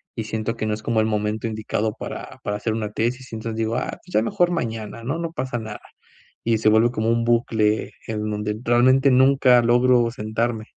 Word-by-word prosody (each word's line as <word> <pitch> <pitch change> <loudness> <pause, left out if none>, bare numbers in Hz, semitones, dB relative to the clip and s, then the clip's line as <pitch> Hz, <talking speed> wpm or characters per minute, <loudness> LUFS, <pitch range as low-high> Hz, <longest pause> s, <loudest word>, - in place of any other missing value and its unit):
y 115 - -3
siento 110 +1 -3
que 110 - -3
no 110 - 0
es 105 - -5
como 115 0 +1
el - - +1
momento 105 +1 -1
indicado 110 0 -2
para, - - -7
para 105 0 -2
hacer 110 +1 -2
una 110 -2 -3
tesis, 125 +4 -2
y - - -5
entonces 110 0 -5
digo: 115 0 -1
"Ah - - -2
pues 180 - -16
ya - - +4
mejor 180 - +1
mañana, 115 -8 -4
¿no? 140 +8 -2
No 165 -1 -3
pasa 130 -6 -3
nada". 110 -2 -7 0.6
Y 115 -1 +2
se 110 - +4
vuelve 110 +2 +4
como 110 -2 -1
un 115 0 +1
bucle 110 -2 +1 0.2
en 110 -1 -3
donde 105 0 -2
realmente 130 +3 +4
nunca 130 -1 +5
logro 120 0 +4
sentarme. 110 0 -2
115 Hz, 210 wpm, -22 LUFS, 110-120 Hz, 0.6 s, nunca